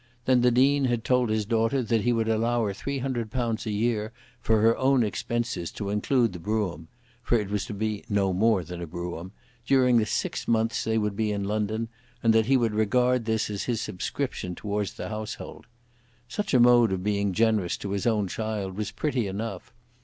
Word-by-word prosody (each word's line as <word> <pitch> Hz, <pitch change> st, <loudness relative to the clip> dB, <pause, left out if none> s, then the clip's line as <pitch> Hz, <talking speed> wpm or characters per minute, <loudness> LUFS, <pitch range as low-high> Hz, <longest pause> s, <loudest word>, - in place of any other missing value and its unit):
Then 130 Hz, -1 st, +4 dB
the 125 Hz, -, +5 dB
Dean 135 Hz, +3 st, +3 dB
had 120 Hz, -3 st, 0 dB
told 125 Hz, -2 st, +2 dB
his 110 Hz, -1 st, 0 dB
daughter 115 Hz, +4 st, +1 dB
that 115 Hz, -1 st, +1 dB
he 120 Hz, -, +2 dB
would 115 Hz, -1 st, 0 dB
allow 115 Hz, +1 st, +1 dB
her 100 Hz, -, -2 dB
£300 120 Hz, -3 st, -2 dB
a -, -, -1 dB
year 110 Hz, 0 st, 0 dB, 0.3 s
for 115 Hz, -1 st, +2 dB
her 115 Hz, +2 st, +4 dB
own 130 Hz, -1 st, +3 dB
expenses, 115 Hz, -3 st, -2 dB
to 100 Hz, -2 st, -4 dB
include 115 Hz, +1 st, +1 dB
the 90 Hz, -, -7 dB
brougham, 90 Hz, -5 st, -2 dB, 0.3 s
for 120 Hz, -1 st, +2 dB
it 100 Hz, -2 st, -4 dB
was 105 Hz, -1 st, -1 dB
to -, -, -5 dB
be 105 Hz, 0 st, -2 dB
no 100 Hz, -2 st, +1 dB
more 105 Hz, 0 st, +3 dB
than 85 Hz, +1 st, -7 dB
a 85 Hz, -, -5 dB
brougham, 85 Hz, +2 st, -6 dB, 0.3 s
during 125 Hz, -1 st, +4 dB
the 110 Hz, -2 st, +2 dB
six -, -, -2 dB
months 115 Hz, 0 st, +1 dB
they 110 Hz, 0 st, +1 dB
would 105 Hz, -2 st, -1 dB
be 110 Hz, 0 st, 0 dB
in 100 Hz, -1 st, -2 dB
London, 110 Hz, +2 st, -1 dB, 0.4 s
and 115 Hz, -1 st, +5 dB
that 110 Hz, 0 st, +3 dB
he 135 Hz, 0 st, +5 dB
would 115 Hz, -3 st, +1 dB
regard 125 Hz, +3 st, +2 dB
this 110 Hz, -1 st, 0 dB
as 100 Hz, -, -3 dB
his 120 Hz, -3 st, -1 dB
subscription 90 Hz, -2 st, -4 dB
towards 105 Hz, 0 st, -3 dB
the -, -, -6 dB
household. 110 Hz, 0 st, -7 dB, 0.6 s
Such 200 Hz, +3 st, -2 dB
a -, -, +6 dB
mode 120 Hz, -2 st, +6 dB
of 95 Hz, -1 st, -2 dB
being 100 Hz, -1 st, 0 dB
generous 110 Hz, -2 st, +1 dB
to 100 Hz, -, -5 dB
his 100 Hz, +2 st, -1 dB
own 105 Hz, -4 st, +1 dB
child 105 Hz, -1 st, -3 dB
was 105 Hz, -1 st, -2 dB
pretty 130 Hz, -8 st, -1 dB
enough. 105 Hz, +4 st, -5 dB
110 Hz, 200 wpm, -26 LUFS, 100-120 Hz, 0.6 s, a